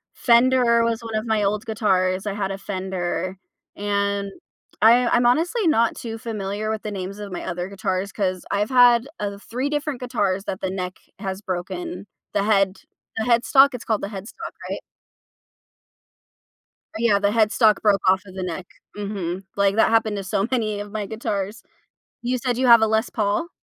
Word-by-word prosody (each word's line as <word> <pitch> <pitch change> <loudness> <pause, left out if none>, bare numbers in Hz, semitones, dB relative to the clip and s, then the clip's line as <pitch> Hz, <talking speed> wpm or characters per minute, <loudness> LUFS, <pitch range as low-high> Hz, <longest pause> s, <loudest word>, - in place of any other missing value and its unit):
Fender 240 -1 +4
was 230 0 0
one 225 -1 -5
of 215 +1 -1
my 220 -2 +1
old 205 +1 0
guitars, 190 -4 +1
I 200 - -1
had 195 -1 -2
a 195 - -4
Fender 185 -1 -3 0.4
and 200 -1 -1 0.5
I 240 +3 +6
I'm 240 +1 +3
honestly 340 - +2
not 235 -7 +3
too 225 -1 -6
familiar 215 -2 -4
with 220 -1 -2
the 210 - -4
names 195 +1 -5
of 205 -2 -7
my 180 - -5
other 175 +1 -4
guitars, 195 -1 -2
'cause 185 -3 -2
I've 205 +1 0
had, 245 -1 +5
uh, 200 -1 -3
3 255 +5 -1
different 295 -2 -2
guitars 200 -6 -1
that 190 - -4
the 190 - -1
neck 185 -1 -4 0.2
has 190 0 -4
broken 205 - -5 0.3
the 200 - +1
head 195 -2 +2 0.4
the 220 - 0
headstock 255 +3 +5
it's 250 - -6
called 220 -2 0
the - - -3
headstock, 200 +1 -8 0.2
right? - - -3 2.2
Yeah, 225 -3 +3
the 200 0 +2
headstock 215 -1 +3
broke 205 -3 +3
off 190 +1 +4
of 185 - -12
the 190 - -5
neck, 180 0 -4 0.3
mhm, 195 -3 -4
like, 200 +1 +2
that 225 - +4
happened 220 -2 +2
to 200 - -4
so 195 +2 0
many 215 -5 -1
of 205 0 -7
my 210 -1 -3
guitars. 210 -1 -4 0.6
You 245 +1 0
said 245 -1 -1
you 260 - +2
have 235 -2 +8
a - - +5
Les 220 +2 +1
Paul? 215 +10 0
210 Hz, 180 wpm, -23 LUFS, 195-235 Hz, 2.2 s, have